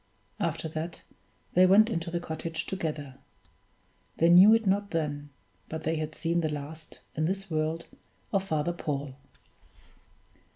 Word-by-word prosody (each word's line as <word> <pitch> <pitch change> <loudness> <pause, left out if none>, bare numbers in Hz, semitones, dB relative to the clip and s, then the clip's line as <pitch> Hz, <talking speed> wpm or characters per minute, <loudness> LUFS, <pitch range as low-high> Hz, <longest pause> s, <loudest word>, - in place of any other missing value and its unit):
After - - -1
that, 160 +2 -5 0.5
they 185 +1 +6
went 205 +4 +7
into 170 -7 -2
the 170 0 -2
cottage 160 -1 -4
together. 150 -7 -4 1.0
They 165 - +4
knew 185 +5 +9
it 225 -1 0
not 200 +1 +1
then, 145 -4 -2 0.4
but 160 0 -5
they 160 +1 0
had 155 0 -4
seen 170 0 0
the 155 - 0
last, 150 +2 -7
in 155 - 0
this 195 +1 -3
world, 160 +1 -1 0.5
of 195 -1 +2
Father 160 -2 -1
Paul. 145 -5 -3
165 Hz, 140 wpm, -29 LUFS, 155-180 Hz, 1.0 s, knew